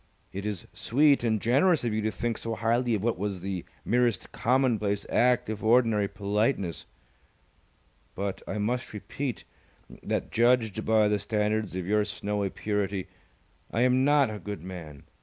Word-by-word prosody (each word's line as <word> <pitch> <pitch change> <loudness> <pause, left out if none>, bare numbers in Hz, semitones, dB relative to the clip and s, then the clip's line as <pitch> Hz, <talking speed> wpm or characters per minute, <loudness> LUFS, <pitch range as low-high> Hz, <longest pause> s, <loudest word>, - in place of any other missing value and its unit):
It 100 +2 -4
is 105 -4 -4
sweet 140 +1 +3
and 110 -2 +1
generous 140 - +3
of 115 -3 -1
you 110 - 0
to 110 - 0
think 115 +1 -3
so 115 -1 -3
highly 115 +2 +1
of 100 - -3
what 115 -5 0
was 100 -2 -3
the 95 -2 -4 0.2
merest 120 -3 +1
commonplace 115 -5 +1
act 125 0 +3
of 110 0 -5
ordinary 110 -3 +3
politeness, 100 - -1 1.3
but 100 0 -3
I - - -3
must 120 +4 -2
repeat, 125 +5 -4 0.6
that - - -2
judged 115 -2 +2
by 110 -1 +4
the 105 0 +1
standards 105 0 -1
of 95 -1 -3
your 105 +2 +2
snowy 105 -1 -2
purity, 100 -2 -2 0.6
I 115 - -1
am 125 +1 +4
not 145 -4 +4
a 105 - -6
good 100 -3 -6
man. 80 -6 -9
110 Hz, 160 wpm, -28 LUFS, 100-120 Hz, 1.3 s, by